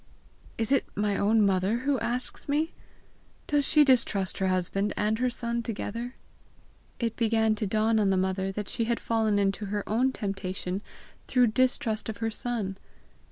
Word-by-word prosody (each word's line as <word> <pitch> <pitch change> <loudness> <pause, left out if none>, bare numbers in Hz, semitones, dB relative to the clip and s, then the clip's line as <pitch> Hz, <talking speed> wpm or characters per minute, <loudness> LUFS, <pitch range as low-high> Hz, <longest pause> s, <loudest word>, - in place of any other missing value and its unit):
"Is 225 +1 -1
it 275 - +4
my 205 -1 0
own 210 +2 +3
mother 195 +5 +1 0.2
asks 250 +3 -3
me? 310 +3 +1 0.7
Does 290 -1 +1
she 300 -1 +6
distrust 230 -7 +2
her 190 - +1
husband 185 +2 0
and 215 +1 +1
her 250 0 +2
son 235 -1 -1
together?" 230 +2 -4 0.8
It 230 -2 -2
began 225 -1 +2
to 210 - -1
dawn 220 +2 +2
on 205 -2 +3
the 190 - +2
mother 190 +1 0
that 205 +1 -5
she 230 - 0
had 235 0 0
fallen 220 -2 +1
into 200 +1 0
her 205 0 -3
own 245 +5 +2
temptation 195 -3 -3 0.5
through 250 -2 +4
distrust 230 -4 +1
of 215 - -5
her 225 0 -2
son. 215 -4 -3
220 Hz, 160 wpm, -28 LUFS, 200-235 Hz, 0.8 s, she